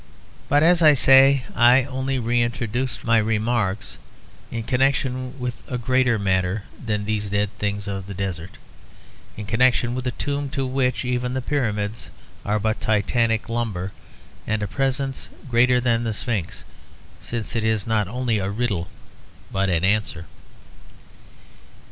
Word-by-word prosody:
But 145 +1 +4
as 175 +1 +5
I 155 -2 +7
say, 135 0 +6
I 125 +2 +6
only 130 0 -2
reintroduce 120 +1 -1
my 115 -1 +3
remarks 110 -2 -1 0.5
in 115 -1 -4
connection 130 +1 0
with 125 -1 -4
a 125 - -1
greater 125 0 +2
matter 95 0 0 0.2
than 105 -3 -2
these 105 -1 -2
dead 100 0 0
things 100 -1 -2
of 95 -1 -4
the 100 - -7
desert; 95 -2 -5 0.8
in 105 - -5
connection 120 +2 +2
with 130 0 -3
a 125 - -4
tomb 145 -1 -2
to 135 - 0
which 130 0 0
even 125 0 -1
the - - 0
Pyramids 110 -6 -2 0.3
are 105 +1 0
but 110 +1 -1
titanic 115 +1 +1
lumber, 110 -6 -3 0.6
and 110 -1 -1
a - - -1
presence 135 +3 -2 0.2
greater 125 0 +4
than 120 -1 +1
the 110 -2 -2
Sphinx, 105 -7 -3 0.6
since 115 -1 -5
it 115 - 0
is 110 -2 0
not 110 -3 +1
only 120 0 -1
a 95 0 -2
riddle 100 -5 -2 0.6
but 95 0 0
an 85 -1 +1
answer. 100 -4 0
115 Hz, 145 wpm, -23 LUFS, 105-130 Hz, 0.8 s, I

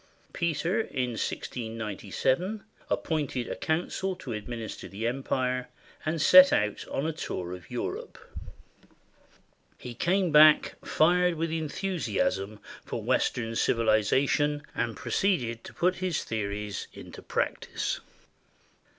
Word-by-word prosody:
Peter, 170 +4 0
in 125 - -2
1697, 115 - -2 0.3
appointed 145 -6 -1
a - - -3
coun 160 +2 0
cil 190 -1 -2
to 135 -9 -6
administer 110 +1 -6
the 105 +3 -5
empire, 125 0 -1 0.4
and 160 +1 0
set 185 +4 +9
out 105 0 +1
on 140 - -2
a 160 - -1
tour 90 - -4
of 90 -1 -10
Europe. - - -4 1.6
He 125 - -8
came 180 +7 +1
back 155 0 +7
fired 180 +2 +3
with 165 0 -2
enthusiasm 145 - -1 0.2
for - - -5
Western 115 -2 +1
civiliza 115 +3 +2
tion, 145 +1 +1
and 115 -2 -2
proceeded 120 - 0
to - - -8
put 180 +1 +1
his 185 -4 -1
theories 105 -2 -3
into - - -10
practice. - - -2
130 Hz, 115 wpm, -28 LUFS, 110-165 Hz, 1.6 s, set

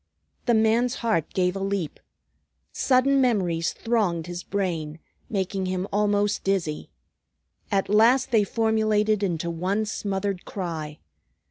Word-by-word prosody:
The 240 - +4
man's 225 +3 +2
heart 215 -9 +1
gave 180 0 +1
a - - -3
leap. 195 -5 -2 0.7
Sudden 270 +1 +3
memories 180 -9 +1
thronged 200 -8 0
his 175 0 -5
brain, 170 -6 -3 0.3
making 190 -2 -2
him 185 +1 -2
almost 205 0 +1
dizzy. 185 -6 -1 0.8
At 195 -1 +1
last 230 +5 +4
they 220 -3 +4
formulated 215 -1 +1
into 170 -3 -1
one 190 +6 -1
smothered 200 -2 -3
cry. 160 -6 -5
200 Hz, 120 wpm, -25 LUFS, 180-220 Hz, 0.8 s, The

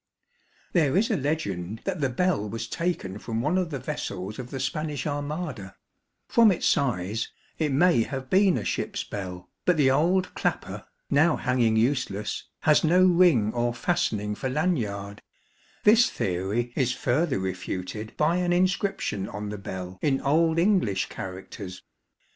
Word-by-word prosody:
There 155 -3 +3
is 225 +5 +2
a - - +2
legend 110 - -2
that 185 -5 -3
the 135 - +2
bell 135 - 0
was 115 +2 -4
taken 140 - -3
from 115 0 -3
one 150 +9 +1
of 185 -2 +1
the 145 - -3
vessels 110 -7 -5
of 125 -1 -6
the 135 - -5
Spanish 150 -2 -2
Armada; 145 - -4 0.5
from 230 -3 +5
its 175 - -1
size 110 -4 0 0.3
it 155 -3 +1
may 165 -1 +4
have 130 +3 -4
been 190 +3 +4
a - - -4
ship's - - -2
bell, 90 -3 -6 0.2
but 180 -2 +3
the 135 -3 +4
old 175 +7 +2
clapper, - - -3 0.3
now 155 +3 +4
hanging 125 -3 +1
useless, 110 -4 0 0.2
has 150 -1 +4
no 180 +3 +5
ring 170 - +4
or 120 0 0
fastening 105 - 0
for 130 +5 -3
lanyard; 110 - -1 0.6
this 225 +3 +6
theory 100 +7 -2
is 125 -2 +1
further 140 - 0
refuted 95 +3 -4
by 160 +3 +2
an 180 -1 0
inscription 180 - 0
on 105 0 -5
the 105 -1 -5
bell 95 -1 -7
in 135 -2 +2
Old 160 +4 +2
English 170 - +2
characters. 95 0 -8
130 Hz, 155 wpm, -26 LUFS, 105-170 Hz, 0.6 s, this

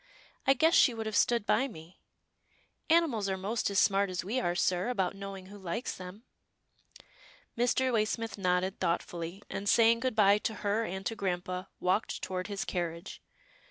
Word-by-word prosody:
I 270 - +6
guess 320 +5 +3
she 245 - +5
would 225 -1 -4
have 220 -1 -3
stood 235 0 +2
by 265 +5 +2
me 165 -6 -13 0.5
— - - -38
Animals 295 -12 +3
are 190 - -1
most 205 +5 -1
as 200 - -2
smart 200 -1 +3
as 180 -1 -3
we 230 +7 -1
are, 175 -8 -1
sir, 180 +3 +1
about 195 -6 -1
knowing 195 -1 -7
who 205 +2 -12
likes 190 +6 -3
them." 185 +4 -10 1.3
Mr. 250 +2 +1
Waysmith 225 +1 0
nodded, 185 0 0
thoughtfully, 170 +2 -3
and, 200 +1 -3
saying 230 0 +5
good 255 -1 -1
bye 205 -1 +5
to 220 - -3
her 210 +3 +1
and 190 0 -5
to 225 - -2
grampa, 185 -1 -3
walked 185 +5 0
toward 185 -1 -3
his 200 -2 -4
carriage. 170 +1 -4
200 Hz, 175 wpm, -30 LUFS, 185-230 Hz, 1.3 s, I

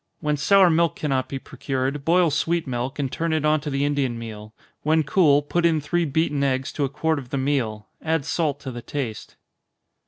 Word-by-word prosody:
When 150 -2 0
sour 185 +5 +5
milk 165 +1 +2
cannot 135 -4 -1
be 135 - -3
procured, 135 +1 -3
boil 170 +1 +3
sweet 165 +3 0
milk, 130 +1 -3
and 135 -3 -2
turn 165 0 -1
it 155 -1 0
on 155 0 +3
to 150 - -4
the 140 0 0
Indian 140 -4 0
meal 110 -2 -8 0.3
when 155 +1 +2
cool, 145 -2 +4
put 170 +4 -1
in 165 -2 +3
three 170 +4 0
beaten 150 -1 0
eggs 130 -1 0
to 145 - 0
a - - -3
quart 155 +2 0
of 125 -3 -11
the 140 - -2
meal 130 -6 -1 0.2
add 160 -3 0
salt 150 -4 -1
to 135 - -5
the 120 -1 -7
taste. 120 -4 -5
145 Hz, 210 wpm, -23 LUFS, 130-160 Hz, 0.3 s, sour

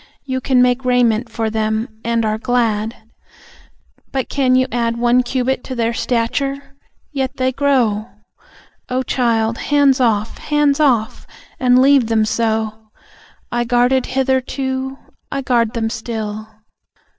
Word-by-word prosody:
You 260 -1 -2
can 255 -1 +3
make 250 +1 +1
raiment 245 -2 +2
for 225 -1 -2
them, 220 +1 -1 0.2
and 230 -1 0
are 215 0 -1
glad, 225 -2 0 1.2
But 265 -2 -2
can 260 -2 +2
you 255 0 +3
add 235 -1 -1
One 240 +1 +3
cubit 255 +1 -1
to 260 - -5
their 230 -1 0
stature? 275 +5 -2 0.4
Yet 265 -3 -3
they 260 0 +1
grow! 245 -6 +1 0.8
Oh, 255 +1 0
child, 230 -3 0
hands 285 -2 +3
off! 220 -3 0
Hands 295 -1 +1
off! 245 -8 +1 0.3
And 250 0 +4
leave 275 -3 +4
them 220 -1 +2
so. 220 -1 -2 0.6
I 240 0 0
guarded 245 +2 +2
hitherto, 265 0 -1 0.3
I 275 -1 -3
guard 235 -2 +1
them 225 -1 -1
still. 220 -2 -5
245 Hz, 135 wpm, -18 LUFS, 225-260 Hz, 1.2 s, And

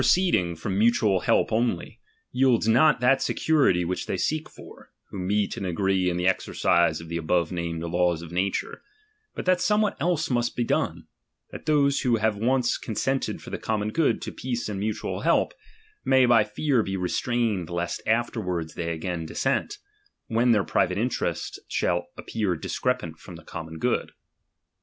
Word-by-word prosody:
I - - -1
the - - +2
i - - +5
'J - - +7
ceeding 90 - +1
from 95 +4 -2
mutual 110 -4 +3
help - - +2
only, 115 +2 -1 0.3
yields 125 -4 +3
not 125 +4 +4
that 135 +2 +4
security 135 - +2
which 90 +2 -3
they - - -1
seek 155 - -1
for, - - -14 0.2
who 100 - -6
meet 100 +3 0
and 100 - -4
agree 95 +1 +1
in 90 - -2
the 90 - -1
exercise 85 -3 +2
of 85 - -10
the 85 +1 -3
above 85 +1 0
named 85 -2 -3
laws 85 0 0
of 85 - -10
nature; 95 +2 -2 0.5
but - - -5
that 185 -1 +3
somewhat 210 +1 +2
else 165 -4 0
must 120 -1 0
be 120 - 0
done, - - -1 0.5
that - - -10
those 140 -2 +3
who 125 -3 +2
have 110 -1 +1
once 120 +3 +1
consented 135 +4 -2
for - - -9
the - - -4
common 105 -1 -1
good 160 +3 +1
to - - -5
peace 120 -2 -4
and 105 -2 -4
mutual 105 +1 -3
help, - - +2 0.5
may 130 -1 +4
by 120 -3 +5
fear 120 +5 0
be 95 -2 -3
restrained 105 - -1
lest 85 0 -3
afterwards 100 -8 -1
they 85 -1 -3
again 80 0 -4
dissent, 135 - -1 0.5
when 120 +1 +2
their 105 -3 +3
private 90 0 +1
interest 120 +4 -2
shall 85 0 0
appear 105 -5 -2
discrepant 85 -2 -2
from 90 - -11
the 85 - -12
common 80 0 -7
good. - - -1
105 Hz, 180 wpm, -25 LUFS, 90-125 Hz, 0.5 s, J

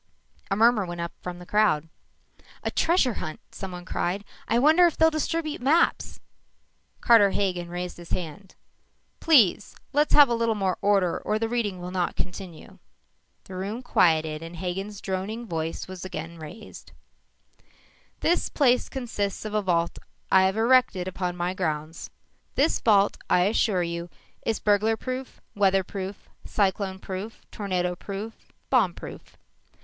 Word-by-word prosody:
_" - - -30
A 195 - +1
murmur 225 0 +4
went 175 0 -6
up 170 0 -3
from 180 -1 -6
the 180 - -11
crowd. 190 -7 +2 0.8
"A - - -1
treasure 325 -8 +2
hunt!" 155 - -6
someone 180 -2 -7
cried. 190 +2 -2 0.2
"I 230 - +2
wonder 315 +7 +6
if 335 - -3
they'll 320 0 +5
distribute 310 -1 -2
maps!" 310 +7 +2 0.8
Carter 225 -4 +6
Hagen 180 -3 -1
raised 180 0 -5
his 175 -1 -11
hand. 180 +2 -5 0.6
"Please! 235 - +4 0.2
Let's 295 +2 +3
have 290 -1 +9
a 240 - 0
little 230 -1 +1
more 190 -3 -1
order 195 -4 +2
or 215 - -1
the 225 +1 -1
reading 225 -6 -2
will 180 0 -6
not 180 -2 -1
continue." 180 -3 -7 0.6
The 190 - -11
room 200 +7 -4
quieted 160 -6 +2
and 165 +1 -8
Hagen's 195 +4 -4
droning 200 +5 -3
voice 165 -4 -4
was 185 -1 -8
again 170 -2 -6
raised: 160 +8 -11 1.3
"_This 345 - +1
place 250 -4 +3
consists 220 -6 -3
of 215 - -5
a 210 - +2
vault 170 -3 0 0.3
I 190 0 +6
have 190 +1 +1
had 220 - 0
erected 230 -7 +3
upon 180 -1 -3
my 175 +1 -1
grounds. 160 -3 -3 0.5
This 290 +4 +2
vault, 205 -3 +3
I 180 - +4
assure 195 -1 +2
you, 170 0 -4 0.4
is 225 - 0
burglar 215 +2 +2
proof, 255 +2 -6
weather 195 -2 +3
proof, 195 +1 -7 0.2
cyclone 195 -1 0
proof, 190 +3 -7
tornado 180 -3 -1
proof, 205 +4 -8 0.2
bomb 220 -10 +3
proof. - - -10
195 Hz, 155 wpm, -26 LUFS, 180-225 Hz, 1.3 s, have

